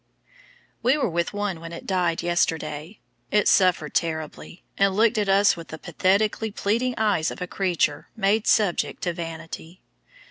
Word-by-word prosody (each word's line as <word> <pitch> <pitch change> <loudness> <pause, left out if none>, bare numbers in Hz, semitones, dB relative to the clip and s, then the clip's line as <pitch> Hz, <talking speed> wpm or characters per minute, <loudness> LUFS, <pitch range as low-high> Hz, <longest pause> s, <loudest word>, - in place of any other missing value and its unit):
We 250 +5 +3
were 265 - 0
with 170 +1 -1
one 205 -4 -3
when 165 0 -8
it 170 - -8
died 180 -3 0
yesterday. 165 0 -1 0.3
It 210 0 +2
suffered 180 -5 +3
terribly, 160 +1 -3
and 195 -1 +2
looked 220 +1 +3
at 205 -2 0
us 200 +1 +5
with 165 -1 -9
the 160 - -8
pathetically 200 +6 +1
pleading 230 +5 -1
eyes 205 -8 +1
of - - -8
a 180 - -3
creature 175 -5 -1
"made 210 +1 +1
subject 205 -6 +1
to 175 - 0
vanity." 165 0 -8
185 Hz, 155 wpm, -24 LUFS, 165-205 Hz, 0.3 s, us